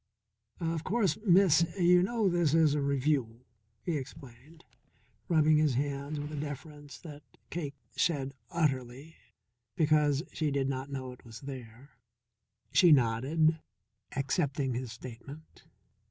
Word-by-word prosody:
"Of 165 Hz, -1 st, -2 dB
course, 195 Hz, -5 st, 0 dB
Miss, 175 Hz, -3 st, +6 dB
you 180 Hz, 0 st, +5 dB
know 220 Hz, +2 st, +1 dB
this 170 Hz, -4 st, +2 dB
is 160 Hz, -3 st, +4 dB
a 150 Hz, -, 0 dB
Revue," 135 Hz, -4 st, 0 dB, 0.4 s
he 170 Hz, -4 st, -1 dB
explained, 135 Hz, +3 st, -11 dB, 0.6 s
rubbing 155 Hz, -2 st, +4 dB
his 150 Hz, -4 st, +2 dB
hands 140 Hz, +2 st, -2 dB
with 145 Hz, +1 st, -5 dB
a -, -, -5 dB
deference 145 Hz, 0 st, -7 dB
that 150 Hz, -3 st, -10 dB, 0.3 s
Cake 145 Hz, -5 st, -4 dB, 0.2 s
shed 140 Hz, -5 st, 0 dB, 0.2 s
utterly, 140 Hz, -2 st, -2 dB, 0.6 s
because 150 Hz, -2 st, +3 dB
she 155 Hz, -2 st, 0 dB
did 140 Hz, -1 st, 0 dB
not 135 Hz, 0 st, -3 dB
know 130 Hz, -2 st, -5 dB
it 125 Hz, -, -14 dB
was 115 Hz, -2 st, -11 dB
there. 130 Hz, 0 st, -9 dB, 0.8 s
She 175 Hz, -3 st, +6 dB
nodded, 145 Hz, +6 st, +3 dB, 0.6 s
accepting 140 Hz, -1 st, -1 dB
his 125 Hz, -1 st, -4 dB
statement. 130 Hz, +6 st, -11 dB
145 Hz, 125 wpm, -30 LUFS, 135-160 Hz, 0.8 s, Miss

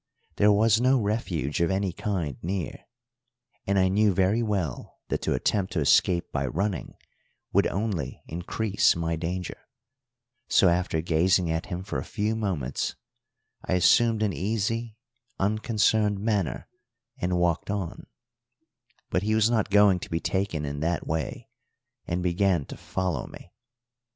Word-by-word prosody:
There 105 Hz, +1 st, +5 dB
was 110 Hz, +2 st, +4 dB
no 130 Hz, +2 st, +4 dB
refuge 95 Hz, -, -1 dB
of 85 Hz, -, +2 dB
any 95 Hz, -1 st, 0 dB
kind 85 Hz, -9 st, -2 dB
near, 90 Hz, -1 st, -4 dB, 0.8 s
and 100 Hz, 0 st, +2 dB
I 95 Hz, -1 st, +4 dB
knew 100 Hz, 0 st, +3 dB
very 95 Hz, +5 st, +2 dB
well 95 Hz, -, -3 dB
that -, -, -1 dB
to -, -, 0 dB
attempt 100 Hz, -2 st, 0 dB
to 85 Hz, -, 0 dB
escape 85 Hz, +4 st, +3 dB
by 70 Hz, -2 st, -1 dB
running 95 Hz, -, -2 dB, 0.6 s
would -, -, +4 dB
only 95 Hz, -, -3 dB
increase 95 Hz, +5 st, +1 dB
my 85 Hz, -1 st, -1 dB
danger, 90 Hz, +2 st, -4 dB, 0.9 s
so 95 Hz, -, +5 dB
after 85 Hz, -2 st, 0 dB
gazing 85 Hz, +1 st, +2 dB
at 80 Hz, 0 st, -2 dB
him 90 Hz, +1 st, -4 dB
for 100 Hz, -, -3 dB
a -, -, -4 dB
few 105 Hz, +1 st, -2 dB
moments 90 Hz, -, -2 dB, 0.7 s
I -, -, -2 dB
assumed 110 Hz, +5 st, +4 dB
an 100 Hz, -3 st, 0 dB
easy, 110 Hz, +4 st, -2 dB, 0.4 s
unconcerned 105 Hz, 0 st, +1 dB
manner 100 Hz, -5 st, -1 dB, 0.5 s
and 90 Hz, 0 st, 0 dB
walked 85 Hz, +1 st, 0 dB
on; 100 Hz, -4 st, -4 dB, 1.0 s
but 90 Hz, -, +1 dB
he 110 Hz, +2 st, +1 dB
was 110 Hz, +1 st, +3 dB
not 110 Hz, -4 st, +1 dB
going 100 Hz, -2 st, +5 dB
to -, -, -8 dB
be 80 Hz, -, -1 dB
taken 90 Hz, -3 st, -1 dB
in 70 Hz, 0 st, -4 dB
that 85 Hz, +2 st, -1 dB
way, 80 Hz, -3 st, -3 dB, 0.6 s
and 90 Hz, +1 st, -2 dB
began 90 Hz, -3 st, +1 dB
to -, -, -9 dB
follow 90 Hz, -9 st, -3 dB
me. 90 Hz, -, -13 dB
95 Hz, 145 wpm, -26 LUFS, 85-105 Hz, 1.0 s, There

